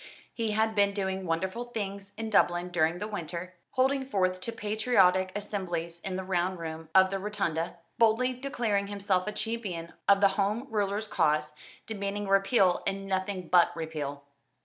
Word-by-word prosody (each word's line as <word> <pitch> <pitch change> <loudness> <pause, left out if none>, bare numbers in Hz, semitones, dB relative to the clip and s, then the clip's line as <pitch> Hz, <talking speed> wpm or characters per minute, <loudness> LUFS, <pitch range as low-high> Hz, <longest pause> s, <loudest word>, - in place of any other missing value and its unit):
He 225 -2 -1
had 220 +1 +2
been 200 -1 +3
doing 190 -2 -2
wonderful 190 +8 -1
things 200 -4 -5
in 225 -1 -4
Dublin 175 -3 +3
during 170 -1 +1
the 205 +3 -4
winter, 180 -3 -5 0.2
holding 265 +1 +2
forth 185 -4 +1
to 230 - -2
patriotic 205 -4 +2
assemblies 175 -5 -3
in 185 +1 -4
the 190 - -3
Round 185 0 0
Room 160 -1 -6
of 190 0 +6
the 195 - -1
Rotunda, 180 -5 -2 0.2
boldly 230 +3 +4
declaring 240 -6 -1
himself 200 -2 0
a - - 0
champion 210 -7 -4 0.2
of 200 0 +7
the 200 -1 +6
Home 205 +5 0
Rulers' 205 0 0
cause, 150 -5 +1 0.3
demanding 205 -1 -3
Repeal 195 -1 +3
and 195 0 -2
nothing 190 -1 -2
but 175 0 +5
Repeal. 150 -3 -4
195 Hz, 160 wpm, -29 LUFS, 180-210 Hz, 0.3 s, of